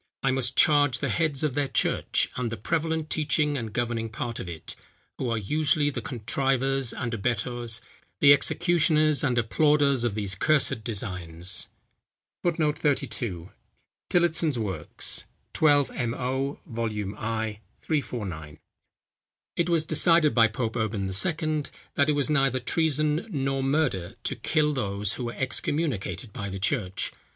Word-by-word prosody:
I 135 - +3
must 130 -1 +1
charge 145 -4 +5
the - - -2
heads 155 -4 0
of 150 -4 +1
their 145 0 0
church, - - +1
and 120 -3 -2
the 115 - -4
prevalent 160 - -1
teaching 150 -1 +1
and 115 -5 -4
governing 115 0 -2
part 115 +1 -4
of 90 - -5
it, 80 -2 -7 0.4
who 125 - -1
are 115 - 0
usually 145 +6 +1
the - - -4
contrivers 135 +1 0
and 120 -2 -4
abettors, 120 +1 -1 0.4
the 145 -1 +8
executioners 155 -1 +3
and 130 -4 +1
applauders 140 +2 +3
of 115 -4 0
these 100 -3 -1
cursed 135 +1 +2
designs." 90 -5 -2 0.7
[Footnote 160 -4 0
32: 110 - -2 0.6
TILLOTSON'S 165 -5 +2
Works, 95 -9 -3 0.3
12mo., 135 -2 +1
Vol. 105 -4 -3
i., 110 -1 -3 0.2
349.] 95 - -3 1.0
It 170 0 0
was 165 -2 +2
decided 165 -2 +4
by 115 -2 +6
Pope 115 +1 -3
Urban 110 -2 -1
II. 155 - 0 0.3
that 140 +1 +2
it - - +4
was 145 -2 +1
neither 135 -3 +2
treason 155 - 0
nor 135 -5 -1
murder 135 - 0
to - - -1
kill 150 -1 +1
those, 105 -4 0
who 125 - -4
were 120 - -4
excommunicated 130 - -2
by 100 -1 -5
the 95 - -5
church. 95 -2 -1
130 Hz, 140 wpm, -26 LUFS, 110-150 Hz, 1.0 s, the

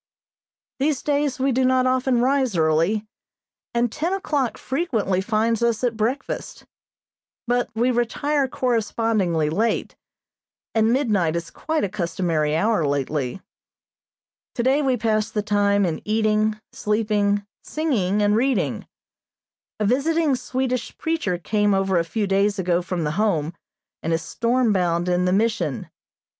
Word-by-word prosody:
These 280 0 0
days 285 -2 0
we 270 +1 +2
do 260 +1 +1
not 255 0 +3
often 255 -1 +2
rise 260 -5 +1
early, 165 +7 +2 0.7
and 235 -1 0
ten 330 +8 -2
o'clock 290 - -1
frequently 230 - -1
finds 225 +2 0
us 235 0 +1
at 240 -2 +1
breakfast, 235 +6 -3 0.8
but 245 -1 0
we 240 +3 +2
retire 270 +4 0
correspondingly 225 -9 0
late, 225 +7 0 0.8
and 220 0 +3
midnight 210 - +1
is 170 -1 -4
quite 315 0 -2
a - - +1
customary 170 -5 -1
hour 210 +1 +2
lately. 140 +2 -2 1.1
Today 260 +4 +2
we 265 -3 +1
passed 220 -1 0
the 210 - 0
time 205 -1 +2
in 165 -3 -2
eating, 215 0 +1
sleeping, 210 -1 0 0.2
singing, 210 - 0
and 205 0 +3
reading. 260 +3 0 0.9
A 210 - +1
visiting 290 +5 +2
Swedish 255 -1 -3
preacher 320 - -1
came 205 +4 +1
over 195 -2 +2
a - - +1
few 205 +5 -2
days 200 +1 +1
ago 180 -2 +1
from 180 -1 -3
the 150 - -1
Home, 165 -7 0 0.5
and 165 - -1
is 165 - -1
storm 235 -1 +1
bound 175 -2 0
in 180 0 +1
the 180 - +2
Mission. 220 +4 0
215 Hz, 135 wpm, -23 LUFS, 190-255 Hz, 1.1 s, not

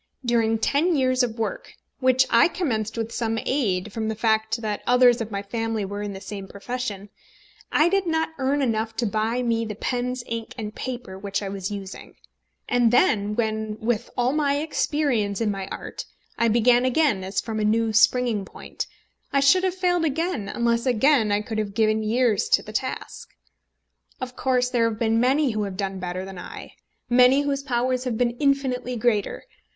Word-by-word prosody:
During 225 -2 +2
ten 305 +9 +1
years 255 -2 +2
of 235 -2 -1
work, 225 - -4 0.3
which 260 0 +4
I 235 - +6
commenced 230 - -2
with 225 0 -3
some 225 -2 -1
aid 210 -7 0
from 220 -1 -2
the 220 - -2
fact 220 +1 +1
that 210 -1 -2
others 245 -1 +5
of 225 - -4
my 200 -1 -4
family 225 0 -2
were 205 +1 -5
in 205 -1 -4
the 190 - -7
same 195 0 -7
profession, 205 -1 -5 0.6
I 310 - +4
did 385 0 +1
not 320 -1 +1
earn 275 +2 +1
enough 225 -2 -1
to 240 - -1
buy 220 +4 0
me 230 -1 +1
the 215 -2 -5
pens, 250 +2 -2
ink, 230 -1 -5
and 215 -2 -5
paper 240 -8 -6
which 200 +1 -3
I 195 - -3
was 195 0 -4
using; 200 -2 -8 0.5
and 245 -2 +3
then 210 - +3
when, 220 -1 -2
with 230 +1 -1
all 250 +2 +2
my 285 -2 +1
experience 285 -9 0
in 220 -2 +1
my 195 -1 -4
art, - - -7 0.3
I 235 - +2
began 240 +2 +4
again 255 -6 +2
as 190 +1 -2
from 220 +2 -4
a - - 0
new 220 +1 +2
springing 230 -1 +3
point, - - -7 0.4
I 280 - +3
should 320 +7 +5
have 375 -1 0
failed 355 -2 +1
again 315 - -1
unless 235 +2 0
again 250 -2 +3
I 205 0 +2
could 220 0 -4
have 200 -2 -3
given 215 0 +2
years 220 -1 +1
to - - -4
the 215 - -10
task. 255 +4 -4 0.9
Of 255 -2 -6
course 250 -1 +1
there 230 -2 +2
have 220 - -5
been 225 0 +1
many 265 +3 +3
who 215 -1 -2
have 190 -2 -6
done 195 -1 -3
better 180 +1 -4
than 190 -2 -8
I, - - -9 0.3
many 250 +3 +5
whose 280 -1 -1
powers 255 -1 -1
have 240 -3 -1
been 240 0 +2
infinitely 265 -3 0
greater. 220 -3 0
230 Hz, 190 wpm, -24 LUFS, 215-255 Hz, 0.9 s, I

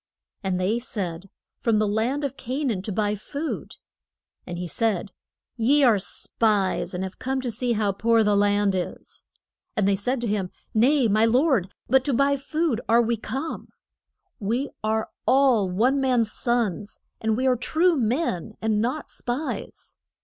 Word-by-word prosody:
And 190 -2 -1
they 205 +6 +1
said, 190 -6 -5 0.3
From 230 -2 +2
the 215 0 +2
land 230 +8 0
of 275 -1 -2
Ca 265 +5 -4
naan 220 -9 -1
to 215 - -3
buy 205 +1 0
food. 285 +9 -5 0.7
And 175 -1 -5
he 180 - -4
said, 200 +1 -1 0.5
Ye 275 +6 +4
are 230 -6 +5
spies, 200 -1 0
and 180 - -2
have 190 0 -7
come 265 +1 -1
to 250 -2 -2
see 240 +2 0
how 210 -2 +1
poor 225 +3 +3
the 210 -1 +3
land 205 0 +3
is. 180 -1 -5 0.5
And 205 -2 +2
they 200 - +3
said 245 +7 -1
to 240 - -1
him, 200 -3 -1 0.2
Nay, 250 +3 +4
my 215 +1 +3
lord, 245 - +2 0.2
but 265 +1 +4
to 285 - +1
buy 280 +2 +3
food 280 -2 -1
are 230 +1 +6
we 235 +1 +1
come. 265 +8 -5 0.7
We 235 +7 -1
are 220 0 -1 0.2
all 255 -8 +4
one 250 +9 +2
man's 245 -5 +2
sons; 225 -4 -1 0.2
and 220 0 0
we 260 - 0
are 255 -1 +4
true 320 +9 +2
men, 230 - -1
and 220 -1 +1
not 255 +6 -2
spies. 255 +6 -5
225 Hz, 170 wpm, -25 LUFS, 205-260 Hz, 0.7 s, are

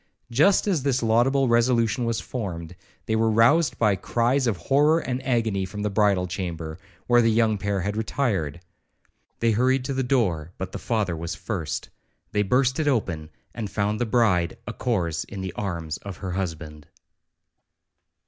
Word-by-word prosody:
Just 155 +11 +4
as 185 -8 +1
this 130 -2 0
laudable 125 +4 +3
resolution 120 0 +2
was 115 -1 0
formed, 90 -8 -5 0.3
they 110 - 0
were 110 0 +2
roused 125 +5 +4
by 105 -3 +3
cries 120 +7 +1
of 110 -5 0
horror 145 - +3
and 130 -5 -3
agony 115 -6 0
from 105 +2 -5
the 105 - -1
bridal 100 -3 +2
chamber, 85 -3 -5 0.3
where 120 0 +5
the 115 - +3
young 110 -2 +2
pair 100 -1 -1
had 100 +3 -2
retired. 105 - -1 0.8
They 115 0 +3
hurried 130 +4 +2
to 135 - -2
the 130 - 0
door, 95 - 0
but 95 -1 -5
the - - -6
father 105 -7 -1
was 85 +1 -4
first. 85 -8 -4 0.4
They 105 - +1
burst 125 +6 +2
it 155 - 0
open, 85 - -1 0.2
and 110 -4 -4
found 105 +1 -1
the 120 - +1
bride 110 -3 +2
a 120 - -5
corse 90 -12 -1
in 100 -1 -8
the 95 -2 -4
arms 85 -6 -4
of 100 -3 -8
her 95 -2 -5
husband. 80 -5 -5
110 Hz, 170 wpm, -25 LUFS, 90-125 Hz, 0.8 s, where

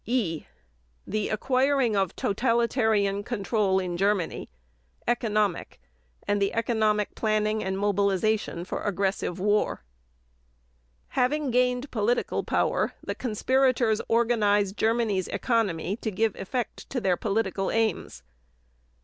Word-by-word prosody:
(E) 210 - -1 0.6
THE 215 +1 -2
ACQUIRING 260 +1 +1
OF 195 -3 0
TOTALITARIAN 220 -3 +1
CONTROL 200 -3 0
IN 180 -2 -3
GERMANY: 195 -2 0 0.6
ECONOMIC; 215 -5 0 0.5
AND 205 0 +1
THE 195 - +1
ECONOMIC 220 -2 +1
PLANNING 215 0 0
AND 190 0 -2
MOBILIZATION 200 -2 0
FOR - - -4
AGGRESSIVE 195 -2 -1
WAR 205 - +1 1.3
Having 280 +2 0
gained 250 +2 +1
political 230 +2 0
power - - 0
the - - -3
conspirators 250 -1 +1
organized 210 -4 +2
Germany's 220 -5 +1
economy 205 -6 0
to 225 - -3
give 215 +1 0
effect 240 +5 -4
to 265 - -2
their 190 -5 +2
political 195 -1 -1
aims. 225 -1 -1
215 Hz, 105 wpm, -26 LUFS, 195-235 Hz, 1.3 s, organized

